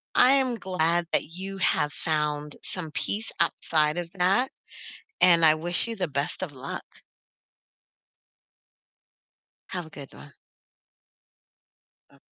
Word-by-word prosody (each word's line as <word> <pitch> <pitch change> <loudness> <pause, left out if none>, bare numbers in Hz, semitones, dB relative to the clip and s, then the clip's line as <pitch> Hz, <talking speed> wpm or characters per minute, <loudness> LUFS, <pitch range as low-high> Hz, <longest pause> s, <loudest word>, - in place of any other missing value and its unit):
I 255 +2 +7
am 260 -3 +2
glad 175 -4 0
that - - +1
you 190 +4 -7
have 150 -5 +1
found 150 -2 -2
some 165 -5 -6
peace 215 +7 -3
outside 155 0 +2
of 175 -1 -3
that, 195 +8 +2 0.7
and 170 -2 +6
I 155 0 +7
wish 175 +7 -1
you 230 - -4
the 180 -4 -1
best 140 +5 -3
of 165 - -4
luck. 135 0 -7 2.8
Have 180 -3 -4
a - - -13
good 140 -3 -11
one. 70 +2 -13 1.8
Oh - - -21
170 Hz, 120 wpm, -27 LUFS, 150-190 Hz, 2.8 s, I